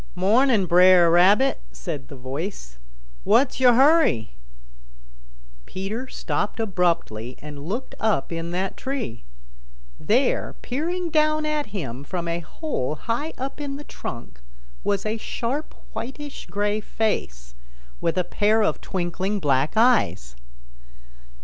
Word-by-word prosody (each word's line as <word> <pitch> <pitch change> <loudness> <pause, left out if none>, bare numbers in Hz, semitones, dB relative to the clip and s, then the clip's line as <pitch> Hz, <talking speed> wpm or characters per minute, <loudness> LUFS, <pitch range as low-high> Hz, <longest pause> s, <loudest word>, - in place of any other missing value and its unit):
"Morning, 215 +3 +3
Bre'r 180 0 +6
Rabbit," 200 +10 +5
said 145 -7 -6
the 145 - -10
voice. 130 - -6 0.4
"What's 245 +6 +3
yo' 250 -2 +6
hurry?" 270 - +4 1.4
Peter 210 +7 -4
stopped 210 -3 -3
abruptly 170 - -1
and 145 0 -9
looked 235 +6 -4
up 210 -10 +1
in 165 0 -3
that 185 +2 -2
tree. 260 - -4 0.8
There, 250 +5 +1
peering 335 +6 -2
down 310 0 +2
at 305 -1 -1
him 140 - -5
from 170 +3 -4
a 170 0 -1
hole 160 - -3
high 235 - -3
up 270 +3 -5
in 280 -1 -4
the 290 - -8
trunk, 115 - -8 0.4
was 200 -1 0
a 215 +1 -1
sharp, 245 +6 -4 0.2
whitish 285 +3 -6
gray 205 +1 -1
face, 60 - -2 0.5
with 165 +1 0
a 180 - +3
pair 215 +4 +2
of - - 0
twinkling 190 +2 -2
black 140 -3 +1
eyes. 220 - +3
200 Hz, 125 wpm, -24 LUFS, 165-255 Hz, 1.4 s, Bre'r